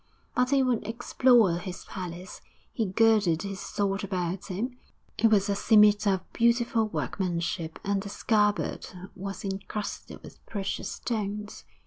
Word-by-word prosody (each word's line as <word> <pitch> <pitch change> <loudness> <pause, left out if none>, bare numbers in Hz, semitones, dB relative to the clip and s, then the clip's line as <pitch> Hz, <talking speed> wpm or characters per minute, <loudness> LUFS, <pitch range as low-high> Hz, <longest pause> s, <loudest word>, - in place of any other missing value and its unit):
But 250 0 +2
he 275 -1 +4
would 245 -5 0
explore 230 -5 +3
his 185 -1 -7
palace! 180 -1 -7 0.3
He 225 -5 0
girded 205 -4 +3
his 195 -1 -5
sword 200 0 -2
about 185 -1 -3
him; 240 +7 -4 0.4
it 225 - +5
was 205 -2 +3
a 200 - +1
scimitar 210 -1 +5
of 185 - -11
beautiful 235 -1 +2
workmanship, 170 - -2
and 200 -1 0
the 200 - -7
scabbard 210 -4 +1 0.3
was 195 -1 -6
incrusted 200 +1 -5
with - - -13
precious 200 -2 -3
stones.... 210 -2 -4
200 Hz, 135 wpm, -28 LUFS, 190-225 Hz, 0.4 s, it